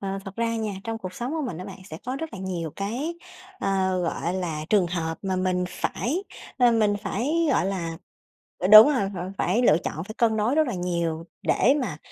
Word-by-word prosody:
Ờ, 195 0 -3
thật 195 -1 -9
ra 230 0 0
nha, 220 -2 -2
trong 225 0 -3
cuộc 185 -4 -7
sống 245 +7 -4
của 320 -1 -2
mình 170 -9 -5
á 180 - -6
bạn 195 0 -9
sẽ - - -6
có 255 +1 -2
rất 320 +2 -5
là - - -7
nhiều 180 -4 -4
cái, 245 +12 -3 0.4
ờ, 190 -1 0
gọi 170 +1 -2
là, 165 -5 -3
trường 200 -4 +4
hợp 165 -2 -3
mà 190 -2 -1
mình 185 -1 0
phải, 310 - -2 0.3
ờ, 245 -2 +6
mình 215 -3 +3
phải, 275 - 0
gọi 255 - +2
là 170 -4 -3 0.6
ơ, 185 - 0
đúng 215 +5 +11
rồi, 250 -10 +1
ờ, 180 +2 -5
phải 200 +8 +1
lựa 155 -10 +5
chọn 160 +3 -3
phải 215 - -8
cân 225 -2 +3
đối 220 +5 +1
rất 310 0 +3
là 240 - -2
nhiều 170 -2 -2 0.2
để 270 - +3
mà 195 -11 -3
195 Hz, 225 wpm, -25 LUFS, 180-235 Hz, 0.6 s, đúng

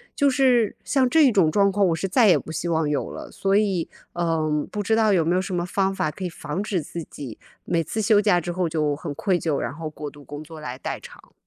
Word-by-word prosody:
就 285 -2 +3
是 250 -5 +3
像 260 -2 +2
这 300 -4 +5
种 185 -7 +3
状 200 +2 +3
况， 200 -1 +2
我 165 - +1
是 195 - -2
再 225 +3 +4
也 185 - +6
不 - - -7
希 160 +2 -3
望 160 -2 +1
有 145 -2 -1
了， - - -8
所 195 0 +1
以， 195 -5 0 0.2
嗯， 160 -3 0
不 210 -1 -3
知 220 +3 +2
道 220 -2 +3
有 170 -4 +3
没 170 - +2
有 185 - +2
什 190 -1 -4
么 175 0 -1
方 195 +1 0
法 155 -4 -1
可 185 - -8
以 180 - -1
防 165 +2 -5
止 205 -3 -1
自 165 +2 -6
己 130 -6 -9 0.3
每 165 -1 +1
次 220 +7 -3
休 210 -1 +5
假 190 -4 +3
之 175 +1 -4
后 175 -1 -1
就 150 -2 0
很 150 0 -6
愧 185 -4 +1
疚， 155 -4 -1
然 - - -3
后 160 0 -5
过 150 -1 -7
度 145 -1 -15
工 145 +2 -8
作 160 0 -11
来 130 -4 -6
代 - - -4
偿。 - - -15
175 Hz, 285 characters per minute, -24 LUFS, 155-205 Hz, 0.3 s, 也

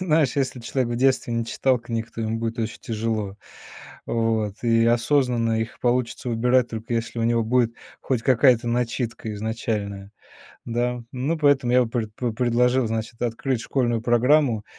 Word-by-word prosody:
Знаешь, 155 -7 +2
если 130 -2 -1
человек 120 0 -1
в - - -2
детстве 130 -2 +2
не 115 0 0
читал 130 +1 +1
книг, 115 -1 -4
то 115 - -6
ему 110 0 -1
будет 115 +1 -3
очень 110 0 -3
тяжело. 110 -3 -3 0.7
Вот. 110 -3 0
И 115 -1 +3
осознанно 120 -2 +2
их 110 - -5
получится 125 0 0
выбирать, 125 +2 +2
только 115 +1 -4
если 115 +1 -3
у 115 - 0
него 115 0 +2
будет 115 0 +2 0.3
хоть 125 -4 -1
какая-то 125 -2 +4
начитка 115 -2 -2
изначальная. 105 -2 -4 0.5
Да. 120 +1 -1
Ну, 140 +6 -1
поэтому 140 -5 +3
я 125 0 +5
бы 115 - -7
пред 110 -3 -3
пре 120 0 -2
предложил, 125 +1 +2
значит, 110 +1 -4
открыть 120 +1 -1
школьную 120 -4 0
программу 120 -1 +3
120 Hz, 160 wpm, -24 LUFS, 115-125 Hz, 0.7 s, я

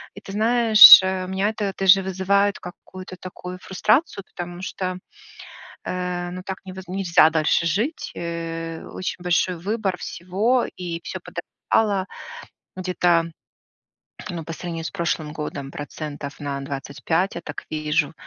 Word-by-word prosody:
И - - -10
ты 195 - -10
знаешь, 225 0 +9
э, 190 -1 -2
меня 190 +2 0
это 210 -3 -3
даже 195 0 +6
вызывает 195 +2 +1
какую-то 185 +1 -10
такую 180 0 -9
фрустрацию, 215 - +1
потому 175 0 -6
что, 185 -1 -4 0.9
э, 180 -1 -3
ну 185 +1 -7
так 190 -1 -5
невоз 190 0 -9
нельзя 180 -4 +4
дальше 160 +1 +1
жить, 215 - -2
э, 165 -1 -5
очень 185 0 -4
большой 180 0 +1
выбор 200 +1 -2
всего 205 +10 0
и 170 -2 -4
всё - - -5
подорожало 200 -3 -1 0.7
где-то, 180 -2 +1 1.1
ну, 170 -3 -5
по 165 - -6
сравнению 165 -1 -6
с - - -4
прошлым 170 -4 -2
годом 145 -3 -6
процентов 145 -1 -7
на 140 -1 -4
25, 140 +6 -2
я - - -4
так - - -7
вижу, 155 0 0
180 Hz, 135 wpm, -23 LUFS, 165-195 Hz, 1.1 s, знаешь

